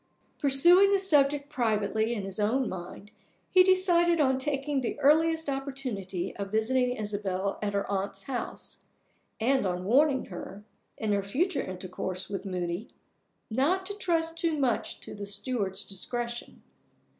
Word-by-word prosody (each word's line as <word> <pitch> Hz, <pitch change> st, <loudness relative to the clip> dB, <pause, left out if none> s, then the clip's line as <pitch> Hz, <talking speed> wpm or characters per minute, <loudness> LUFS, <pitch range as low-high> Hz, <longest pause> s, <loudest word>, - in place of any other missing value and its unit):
Pursuing 345 Hz, +8 st, +6 dB
the 400 Hz, -, +5 dB
subject 290 Hz, -6 st, +3 dB
privately 220 Hz, -4 st, 0 dB
in 205 Hz, -, -4 dB
his 195 Hz, +1 st, -5 dB
own 235 Hz, +5 st, +1 dB
mind, 185 Hz, +3 st, -8 dB, 0.4 s
he 370 Hz, -, +7 dB
decided 355 Hz, -2 st, +4 dB
on 265 Hz, -3 st, +3 dB
taking 275 Hz, 0 st, -1 dB
the 240 Hz, -, -3 dB
earliest 320 Hz, +2 st, +3 dB
opportunity 255 Hz, -10 st, -4 dB
of 200 Hz, -1 st, -5 dB
visiting 250 Hz, +3 st, +1 dB
Isabel 200 Hz, -3 st, -3 dB
at 205 Hz, -1 st, -2 dB
her 200 Hz, 0 st, 0 dB
aunt's 195 Hz, 0 st, -3 dB
house, 255 Hz, -3 st, -6 dB, 0.6 s
and 260 Hz, +4 st, +2 dB
on 180 Hz, 0 st, -3 dB
warning 265 Hz, +5 st, +3 dB
her, 195 Hz, +3 st, -8 dB, 0.3 s
in 215 Hz, -1 st, -1 dB
her 200 Hz, -, +1 dB
future 295 Hz, -, 0 dB
intercourse 185 Hz, 0 st, -5 dB
with 195 Hz, -1 st, -4 dB
Moody, 180 Hz, +2 st, -3 dB, 0.6 s
not 315 Hz, +11 st, +1 dB
to 405 Hz, -, -3 dB
trust 330 Hz, -5 st, -1 dB
too 330 Hz, -2 st, 0 dB
much 255 Hz, -5 st, -1 dB
to -, -, -7 dB
the 200 Hz, -1 st, -7 dB
steward's 200 Hz, -2 st, -1 dB
discretion. 240 Hz, +4 st, -5 dB
245 Hz, 145 wpm, -28 LUFS, 200-295 Hz, 0.6 s, he